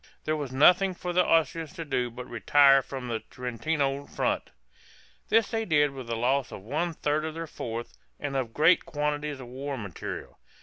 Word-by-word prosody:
There 155 - 0
was 145 -4 -4
nothing 180 +7 +5
for 180 0 -4
the 180 +1 +4
Austrians 160 -1 +1
to 165 -3 -6
do 125 -4 0
but 125 +1 -8
retire 135 +4 +5
from 130 -1 -7
the 115 -2 -2
Trentino 135 +4 -2
front. - - -1 0.8
This 225 0 +3
they 225 0 0
did 150 -7 +3
with 130 -3 -8
the 115 - -2
loss 130 +3 +1
of 95 - -8
one 160 - -2
third 150 +1 0
of 160 0 -4
their 165 0 -4
force, 120 -6 -6 0.3
and 145 -1 -4
of 130 -4 -1
great 160 +8 +4
quantities 150 -1 -2
of 130 - -8
war 135 +3 -5
material. 100 -7 -7
140 Hz, 185 wpm, -28 LUFS, 125-160 Hz, 0.8 s, nothing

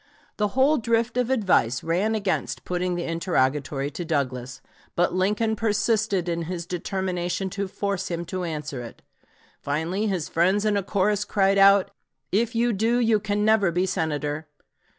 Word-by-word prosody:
The 210 +3 -1
whole 285 +3 +4
drift 230 +1 0
of 250 -1 0
advice 180 - +2
ran 190 +7 +1
against 205 -3 -2
putting 180 0 -1
the 175 - -2
interrogatory 145 -4 0
to 175 - -5
Douglas; 130 -5 -2 0.4
but 175 0 +2
Lincoln 210 +4 +1
persisted 215 -3 +1
in 170 -1 -2
his 170 0 -4
determination 180 +1 -2
to 200 0 -3
force 200 0 -3
him 170 0 -3
to 185 +1 -4
answer 150 -6 -4
it. 115 - -11 0.6
Finally 165 +9 -1
his 185 -7 -1
friends 190 +5 +2
in 210 -1 +2
a 200 - +1
chorus 200 +1 +1
cried 200 -1 +2
out, 195 0 +6 0.4
"If 230 +4 +1
you 235 +1 +2
do, 225 +4 +1
you 225 -3 +3
can 210 0 -1
never 215 -4 +4
be 180 +2 +1
Senator." 155 -3 -2
190 Hz, 160 wpm, -25 LUFS, 165-210 Hz, 0.6 s, out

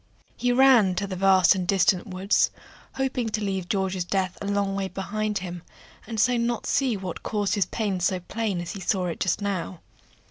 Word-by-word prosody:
He 245 - 0
ran 245 -7 +5
to 200 - -1
the 190 -1 -5
vast 190 0 +5
and 185 -2 -3
distant 185 +1 +2
woods, 190 +1 +2 0.4
hoping 260 -3 -1
to 215 0 -2
leave 190 -3 -3
George's 190 -2 0
death 185 0 -1
a 200 - -4
long 200 -1 0
way 195 -1 -1
behind 210 +2 -3
him, 175 -1 -6 0.5
and 225 -2 -4
so 245 +3 +3
not 235 0 -1
see 255 -6 +1
what 185 -3 -6
caused 205 -2 -1
his 200 -5 +1
pain 205 -4 -2
so 185 +1 +1
plain 195 0 -3
as 175 - -5
he 200 - -7
saw 190 -1 0
it 170 - -4
just 185 +2 0
now. 185 -3 -3
195 Hz, 200 wpm, -25 LUFS, 185-215 Hz, 0.5 s, ran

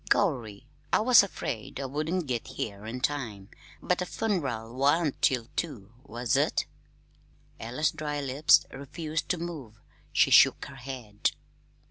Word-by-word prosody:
Gorry! 120 - +1 0.3
I - - +4
was 245 +2 +8
afraid 135 - -5
I 135 - -3
wouldn't 155 +6 -2
git 125 -4 -3
here 100 0 -5
in 125 +3 -5
time, 115 -9 -3 0.3
but 180 - +1
the 180 - -2
fun'ral 135 - -2
wan't 145 +3 +1
till 125 -3 +2
two, 120 - -4
was 120 -3 -1
it?" - - +2 0.9
Ella's 125 +7 0
dry 150 -1 -3
lips 140 +2 +4
refused 155 +4 -5
to 180 - +1
move. 155 -11 -7 0.3
She - - +3
shook - - +6
her 140 0 -11
head. 125 -5 -3
135 Hz, 140 wpm, -28 LUFS, 115-160 Hz, 0.9 s, was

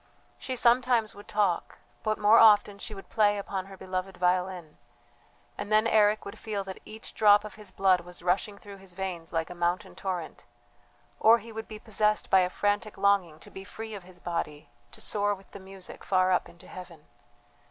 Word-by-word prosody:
She 260 - -4
sometimes 240 -2 +3
would 205 +1 -13
talk, 200 -5 0 0.2
but 215 -1 -1
more 210 +2 +6
often 205 -2 +6
she 210 - -7
would 195 - -11
play 205 -1 +2
upon 195 -1 -4
her 195 -1 -11
beloved 185 0 -4
violin, 180 -2 -1 0.8
and 205 - -5
then 215 +1 +4
Eric 215 -1 +3
would 200 - -9
feel 205 -3 -3
that 190 -1 -8
each 220 +1 -10
drop 205 -1 +5
of 215 - -8
his 210 -2 -10
blood 190 -1 +3
was 175 0 -12
rushing 195 +3 0
through 200 -1 -12
his 190 -2 -12
veins 180 -3 -5
like 165 0 -2
a - - -5
mountain 175 +1 -1
torrent; 180 -4 -5 0.7
or 225 +2 +7
he 230 +1 -11
would 220 0 -7
be 215 - -8
possessed 215 0 0
by 190 - +7
a 180 -1 +2
frantic 205 +3 -1
longing 195 -6 +2
to - - -13
be 190 - -8
free 220 +2 -8
of 200 - -6
his 180 0 -13
body 165 -4 -4 0.2
to - - -9
soar 205 0 0
with 195 0 -18
the - - -9
music 190 -1 -11
far 185 -1 +2
up 180 - +1
into 170 - -17
heaven. 170 -4 -11
195 Hz, 195 wpm, -28 LUFS, 180-215 Hz, 0.8 s, or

